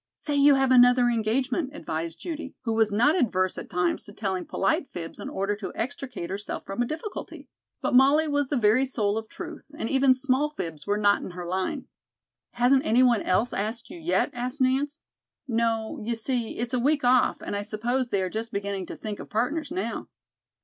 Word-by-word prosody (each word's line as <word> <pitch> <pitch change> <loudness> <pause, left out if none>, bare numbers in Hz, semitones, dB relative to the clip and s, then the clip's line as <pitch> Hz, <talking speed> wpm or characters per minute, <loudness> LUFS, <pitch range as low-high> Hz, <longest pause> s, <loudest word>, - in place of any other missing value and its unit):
"Say 295 - -3
you 285 0 +6
have 270 -1 +2
another 245 -1 +6
engagement," 255 +6 0
advised 165 - -4
Judy, 315 -5 -6
who 225 -3 -1
was 220 -1 +2
not 240 - +4
averse 185 - +1
at - - -9
times 180 -1 0
to 205 - -9
telling 190 -3 -3
polite 285 - 0
fibs 165 -2 -7
in - - -5
order 195 +2 -1
to 205 - -5
extricate 250 -7 -4
herself 200 +2 -5
from 195 +5 -3
a 240 - +1
difficulty. 320 - -6 0.3
But - - -1
Molly 280 +5 +5
was 285 -2 0
the 290 - +1
very 225 +3 +4
soul 215 -6 0
of 220 - -11
truth, 335 -3 -8
and 225 - -2
even 265 0 +4
small 265 +3 +1
fibs 165 - -6
were 205 +1 +1
not 205 -1 +3
in - - -6
her 175 0 -7
line. 190 - -2 0.7
"Hasn't 250 +3 +4
any 250 -3 +4
one 240 -4 +4
else 215 +6 +1
asked 225 +6 -3
you 345 - -8
yet?" 330 +2 +1
asked 250 +3 -3
Nance. 275 +4 +1 0.5
"No; 225 -2 0
you 235 +2 -1
see, 235 0 -2
it's 240 +2 -3
a 250 - +2
week 285 +3 +2
off, 250 0 +4
and - - -3
I 200 - -1
suppose 235 +5 -1
they 195 -3 +1
are 185 - -2
just 225 +1 -4
beginning 200 -3 -3
to - - -6
think 210 -1 -6
of - - -9
partners 285 +8 -1
now." 355 +3 -3
240 Hz, 205 wpm, -26 LUFS, 205-270 Hz, 0.7 s, you